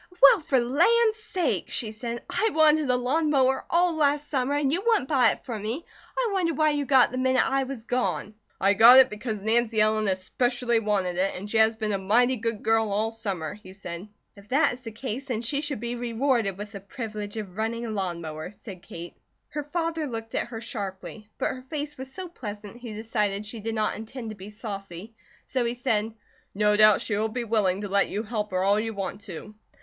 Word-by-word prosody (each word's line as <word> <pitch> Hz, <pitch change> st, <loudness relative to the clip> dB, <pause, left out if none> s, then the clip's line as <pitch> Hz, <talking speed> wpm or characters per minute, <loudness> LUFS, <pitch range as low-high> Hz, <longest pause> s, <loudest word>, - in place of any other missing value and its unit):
"Well, 280 Hz, -, +8 dB
for 290 Hz, -4 st, +2 dB
land's 430 Hz, -, +3 dB
sake!" 395 Hz, -5 st, -1 dB
she 220 Hz, -4 st, -3 dB
said. 235 Hz, +2 st, -5 dB
"I 445 Hz, -, +1 dB
wanted 310 Hz, -2 st, +4 dB
a 250 Hz, -, +4 dB
lawn 285 Hz, +6 st, +1 dB
mower 265 Hz, -2 st, +2 dB
all 345 Hz, 0 st, +3 dB
last 295 Hz, -1 st, +1 dB
summer, 270 Hz, 0 st, +1 dB
and 290 Hz, -1 st, +1 dB
you 355 Hz, -, 0 dB
wouldn't 445 Hz, -, +2 dB
buy 260 Hz, -6 st, +4 dB
it -, -, -4 dB
for 230 Hz, -4 st, -4 dB
me. 225 Hz, +10 st, -4 dB, 0.3 s
I -, -, +1 dB
wonder 345 Hz, -5 st, +1 dB
why 310 Hz, +1 st, +3 dB
you 290 Hz, -1 st, -1 dB
got 265 Hz, -3 st, +6 dB
it -, -, -18 dB
the 255 Hz, -, -4 dB
minute 260 Hz, 0 st, +3 dB
I 270 Hz, 0 st, +1 dB
was 260 Hz, -4 st, -7 dB
gone." 245 Hz, -3 st, -1 dB, 0.3 s
"I 195 Hz, +1 st, +4 dB
got 235 Hz, +5 st, +9 dB
it 260 Hz, -1 st, +7 dB
because 210 Hz, -1 st, -4 dB
Nancy 225 Hz, 0 st, +2 dB
Ellen 215 Hz, 0 st, +3 dB
especially 240 Hz, +5 st, 0 dB
wanted 195 Hz, -5 st, 0 dB
it, 190 Hz, +2 st, +1 dB
and 195 Hz, +3 st, -7 dB
she 220 Hz, +2 st, +1 dB
has 220 Hz, +1 st, +5 dB
been 215 Hz, -1 st, -2 dB
a 200 Hz, -, 0 dB
mighty 240 Hz, +7 st, +3 dB
good 230 Hz, -2 st, -3 dB
girl 225 Hz, -1 st, +2 dB
all 215 Hz, +2 st, +1 dB
summer," 195 Hz, -9 st, -4 dB
he 205 Hz, -3 st, -13 dB
said. 180 Hz, 0 st, -7 dB, 0.3 s
"If 200 Hz, 0 st, -16 dB
that 285 Hz, +2 st, +3 dB
is 245 Hz, -, -9 dB
the 230 Hz, -3 st, -7 dB
case, 250 Hz, +3 st, -5 dB
then 235 Hz, -3 st, -2 dB
she 280 Hz, +5 st, 0 dB
should 290 Hz, -5 st, -3 dB
be 235 Hz, +2 st, -3 dB
rewarded 235 Hz, -4 st, 0 dB
with 205 Hz, 0 st, -7 dB
the 200 Hz, -, -7 dB
privilege 215 Hz, -2 st, -6 dB
of 195 Hz, -4 st, -6 dB
running 225 Hz, +2 st, -2 dB
a 225 Hz, -, -4 dB
lawn 185 Hz, -5 st, -2 dB
mower," 155 Hz, 0 st, -6 dB
said 195 Hz, -2 st, -11 dB
Kate. 170 Hz, 0 st, -9 dB, 0.4 s
Her 300 Hz, -, -3 dB
father 325 Hz, +1 st, -2 dB
looked 225 Hz, -2 st, -6 dB
at -, -, 0 dB
her 225 Hz, -2 st, -7 dB
sharply; 210 Hz, -1 st, -6 dB
but -, -, 0 dB
her 255 Hz, -, -7 dB
face 295 Hz, -1 st, -3 dB
was 265 Hz, 0 st, -8 dB
so 370 Hz, +5 st, -6 dB
pleasant 210 Hz, -, -8 dB
he 240 Hz, -2 st, -8 dB
decided 210 Hz, -2 st, -1 dB
she 220 Hz, +2 st, -7 dB
did 225 Hz, +1 st, -3 dB
not 215 Hz, -1 st, 0 dB
intend 225 Hz, +1 st, -7 dB
to -, -, -8 dB
be 195 Hz, +1 st, -9 dB
saucy, 205 Hz, -2 st, -7 dB, 0.3 s
so 255 Hz, -2 st, -1 dB
he 235 Hz, +1 st, -1 dB
said: 225 Hz, -3 st, 0 dB, 0.4 s
"No 210 Hz, 0 st, +3 dB
doubt 215 Hz, 0 st, +6 dB
she 210 Hz, -, -1 dB
will 215 Hz, +2 st, 0 dB
be 240 Hz, +2 st, -3 dB
willing 205 Hz, -4 st, +1 dB
to 205 Hz, -, -3 dB
let 200 Hz, 0 st, +2 dB
you 210 Hz, -, -2 dB
help 210 Hz, -2 st, -3 dB
her 185 Hz, 0 st, 0 dB
all 200 Hz, +2 st, +3 dB
you 225 Hz, 0 st, -3 dB
want 195 Hz, +1 st, -4 dB
to." 195 Hz, +2 st, -8 dB
225 Hz, 225 wpm, -26 LUFS, 210-265 Hz, 0.4 s, got